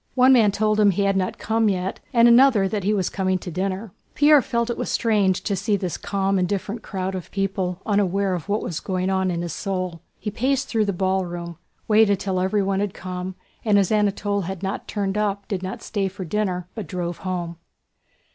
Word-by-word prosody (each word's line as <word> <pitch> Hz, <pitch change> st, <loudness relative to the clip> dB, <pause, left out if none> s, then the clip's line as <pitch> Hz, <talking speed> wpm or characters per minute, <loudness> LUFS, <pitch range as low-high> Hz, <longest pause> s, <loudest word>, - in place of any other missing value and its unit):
One 260 Hz, +1 st, +6 dB
man 220 Hz, -5 st, +5 dB
told 215 Hz, +1 st, +1 dB
him 205 Hz, -1 st, +6 dB
he 200 Hz, +1 st, +1 dB
had 195 Hz, 0 st, +2 dB
not 185 Hz, -1 st, -1 dB
come 225 Hz, 0 st, +1 dB
yet, 190 Hz, 0 st, -2 dB
and 235 Hz, -2 st, +6 dB
another 235 Hz, -4 st, +6 dB
that 205 Hz, 0 st, -2 dB
he 205 Hz, -, +1 dB
was 195 Hz, -4 st, +1 dB
coming 190 Hz, -1 st, 0 dB
to 180 Hz, -, -7 dB
dinner. 190 Hz, +3 st, -3 dB, 0.2 s
Pierre 295 Hz, -1 st, +6 dB
felt 235 Hz, 0 st, -1 dB
it -, -, -3 dB
strange 205 Hz, -5 st, +1 dB
to 200 Hz, -, 0 dB
see 205 Hz, +3 st, 0 dB
this 185 Hz, -3 st, -3 dB
calm, 195 Hz, -1 st, 0 dB
indifferent 200 Hz, +4 st, -2 dB
crowd 190 Hz, -1 st, -4 dB
of 185 Hz, -2 st, -6 dB
people 190 Hz, -2 st, -2 dB
unaware 200 Hz, -2 st, +1 dB
of 180 Hz, +2 st, -5 dB
what 210 Hz, +1 st, 0 dB
was 165 Hz, -, -3 dB
going 185 Hz, 0 st, -1 dB
on 190 Hz, -1 st, +1 dB
in 170 Hz, -1 st, -2 dB
his 170 Hz, -3 st, -4 dB
soul. 185 Hz, -3 st, -3 dB, 0.2 s
He 210 Hz, -, -4 dB
paced 265 Hz, +4 st, 0 dB
through 220 Hz, -2 st, +1 dB
the 200 Hz, -, 0 dB
ballroom, 175 Hz, -3 st, -2 dB, 0.3 s
waited 210 Hz, -2 st, +4 dB
till 190 Hz, -2 st, -1 dB
everyone 195 Hz, +1 st, +1 dB
had 200 Hz, -1 st, -2 dB
come, 185 Hz, 0 st, -5 dB, 0.3 s
and 210 Hz, -2 st, +3 dB
as 195 Hz, -1 st, +2 dB
Anatole 205 Hz, -1 st, +1 dB
had 190 Hz, +1 st, -6 dB
not 195 Hz, +1 st, -3 dB
turned 200 Hz, -1 st, -1 dB
up 200 Hz, -1 st, -1 dB
did 195 Hz, -3 st, -3 dB
not 185 Hz, 0 st, -6 dB
stay 200 Hz, -2 st, -1 dB
for 190 Hz, 0 st, -6 dB
dinner 180 Hz, -1 st, -2 dB
but 215 Hz, -7 st, -6 dB
drove 175 Hz, -1 st, -3 dB
home. 175 Hz, -3 st, -4 dB
195 Hz, 205 wpm, -23 LUFS, 185-210 Hz, 0.3 s, One